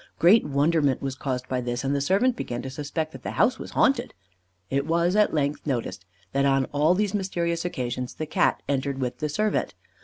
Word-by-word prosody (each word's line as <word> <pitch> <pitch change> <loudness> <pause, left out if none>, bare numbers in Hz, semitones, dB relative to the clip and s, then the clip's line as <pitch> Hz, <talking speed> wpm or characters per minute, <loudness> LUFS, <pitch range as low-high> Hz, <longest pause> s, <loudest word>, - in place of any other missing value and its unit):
Great 190 +7 +6
wonderment 145 -1 +2
was 135 -1 -3
caused 130 -1 -4
by 130 -1 -1
this, 120 0 -3
and 135 +1 0
the 140 - 0
servant 200 - +2
began 120 - -4
to 130 - -5
suspect 150 +3 -3
that - - -10
the - - -5
house - - +3
was - - -7
haunted. 260 -3 +2 0.6
It 140 +2 0
was, 170 +3 +2
at 210 0 +4
length, 150 0 -1
noticed 95 -9 -3 0.2
that 140 0 +1
on 135 -1 +3
all 150 +5 +3
these 205 0 0
mysterious 170 -4 -1
occasions 125 -6 -3
the 155 - -3
Cat 155 - +1
entered 140 0 -1
with 125 -2 -3
the 155 -1 -1
servant. 215 +8 0
145 Hz, 205 wpm, -25 LUFS, 135-170 Hz, 0.6 s, Great